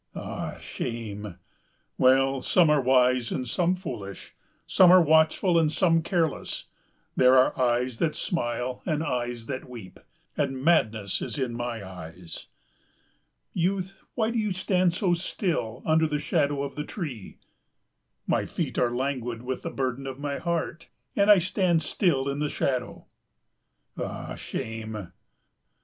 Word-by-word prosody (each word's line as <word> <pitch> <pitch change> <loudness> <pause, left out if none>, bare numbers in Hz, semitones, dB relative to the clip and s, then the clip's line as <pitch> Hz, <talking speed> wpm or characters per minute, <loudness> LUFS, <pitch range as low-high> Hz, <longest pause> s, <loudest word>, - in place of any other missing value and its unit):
"Ah, - - -5
shame!" 105 -5 -5 0.6
"Well, 135 +1 +4
some 165 +3 +4
are 150 -2 +4
wise 125 -1 +3
and 125 - -2
some 175 +8 +1
foolish, 120 - -7 0.3
some 185 -2 +6
are 185 - +9
watchful 160 +2 +4
and 155 -2 +2
some 165 -1 +3
careless. 165 -3 -1 0.5
There 130 0 +6
are 130 - +4
eyes 125 -1 +1
that 160 -2 +1
smile 125 -5 -2
and 155 -2 0
eyes 120 -5 -2
that 130 0 -5
weep 110 -7 -10 0.4
and 135 -3 -1
madness 110 - +2
is - - -4
in 130 -4 -1
my 115 -4 -4
eyes." 90 -1 -9 1.1
"Youth, 190 +2 -1
why 225 -2 +1
do 230 - 0
you 210 -3 0
stand 185 -1 +2
so 180 0 +1
still 170 - -2
under 160 0 +3
the 150 -1 -1
shadow 145 -1 0
of 140 - -5
the 150 - -4
tree?" 145 - -6 0.9
"My - - 0
feet - - -3
are 125 - +3
languid 125 -3 -2
with 130 +1 -3
the - - -4
burden 135 0 -3
of 130 -1 -5
my 145 0 -3
heart, 170 -1 -3 0.3
and 200 0 +3
I 210 - +9
stand 180 -2 +1
still 140 -9 +1
in 140 +1 -2
the 150 0 0
shadow." 125 -4 -2 0.9
"Ah, - - -5
shame!" 110 -4 -6
135 Hz, 145 wpm, -27 LUFS, 120-170 Hz, 1.1 s, are